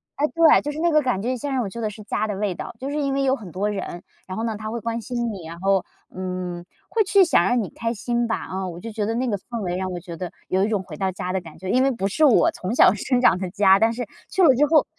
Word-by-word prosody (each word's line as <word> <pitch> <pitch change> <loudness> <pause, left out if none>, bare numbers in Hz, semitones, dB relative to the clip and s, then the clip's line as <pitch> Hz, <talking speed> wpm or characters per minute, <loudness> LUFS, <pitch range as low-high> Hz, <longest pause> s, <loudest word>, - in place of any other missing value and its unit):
唉 290 - +1
对， 330 -2 +6
就 295 - -3
是 300 - -6
那 340 +1 +2
个 305 - +5
感 245 -8 0
觉 240 - -2
现 285 +4 -4
在 - - -3
让 255 -2 +1
我 195 - -4
觉 235 - -8
得 215 - 0
是 215 - -11
家 215 - -1
的 205 - -3
味 195 -3 -1
道， - - -7
就 270 +2 -4
是 290 - -3
因 275 -1 0
为 275 - 0
有 265 0 +3
很 200 -9 -10
多 200 +4 -1
人， 185 -3 -5 0.3
然 185 - -5
后 225 - -2
呢 225 -2 -2
他 215 +1 -5
会 235 - -3
关 230 +1 -2
心 240 -1 -2
你， 185 -5 -8
然 170 +1 -9
后， 195 0 +2 0.3
嗯， 180 -1 -4 0.2
会 445 -2 +2
去 390 0 +5
想 320 - +4
让 245 +5 +2
你 - - -6
开 230 0 -3
心 240 +2 -1
吧， 225 - 0
啊， 190 0 -4
我 175 -1 -7
就 225 +5 -7
觉 210 -1 -2
得 225 - -1
那 255 +2 0
个 205 -3 0
氛 235 +3 -6
围 180 -2 -2
让 185 0 -3
我 175 - -4
觉 170 -2 -9
得 180 -2 -5 0.2
有 190 +1 +1
一 - - 0
种 210 -3 0
回 160 -4 -10
到 190 +2 0
家 185 0 -4
的 190 - +1
感 170 - -13
觉， 185 - -6
因 255 +6 +3
为 270 - +3
不 195 -6 -1
是 310 +10 +3
我 265 - +5
从 190 +5 -4
小 - - +7
生 250 +4 0
长 180 - +5
的 190 - -3
家， 195 -1 +5
但 225 +1 +3
是 240 -2 -4 0.2
去 380 - 0
了 275 - +7
之 295 +4 +4
后， 310 -1 +4
215 Hz, 340 characters per minute, -23 LUFS, 185-250 Hz, 0.3 s, 小